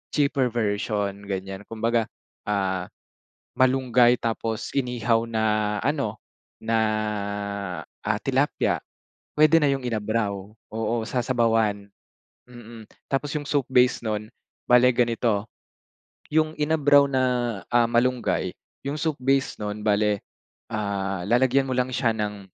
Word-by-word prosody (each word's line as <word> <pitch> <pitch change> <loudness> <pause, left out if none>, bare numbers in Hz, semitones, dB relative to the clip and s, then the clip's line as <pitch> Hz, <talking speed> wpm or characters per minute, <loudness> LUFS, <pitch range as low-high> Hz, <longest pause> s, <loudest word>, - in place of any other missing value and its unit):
cheaper 140 -3 +2
version, 105 -2 -1
ganiyan. 95 0 -5
Kumbaga, 115 0 0 0.4
ah, 95 -3 -1 0.7
malunggay 125 -2 +4
tapos 115 -1 -2
inihaw 120 -3 +1
na 110 -1 -1 0.4
ano, 140 -7 -1 0.5
na, 115 0 +1 1.3
ah, - - 0
tilapia. - - +1 0.6
Puwede 155 +2 +6
na 150 - +3
yung 135 - -3
inabraw. 110 -2 -1 0.4
Oo, 110 +1 -1
sasabawan, 115 -4 0 0.6
mm. 120 -2 -12 0.3
Tapos 140 +2 -1
yung 150 - -3
soup 140 -3 0
base 125 -1 +3
nun, 105 0 -3 0.4
bale 125 0 +7
ganito. 115 -4 +1 0.9
Yung 155 0 +2
inabraw 145 -2 +4
na, 130 -1 +1 0.5
ah, 120 -1 +5
malunggay, 120 +1 +1 0.3
yung 145 +2 -3
soup 160 -1 0
base 135 +1 +1
nun, 105 0 -4
bale, 105 -1 +1 0.5
ah, 100 -3 -2
lalagyan 130 +2 +3
mo 130 - -2
lang 125 0 +1
siya 120 -3 +1
ng, 105 -2 -4
115 Hz, 115 wpm, -25 LUFS, 105-130 Hz, 1.3 s, bale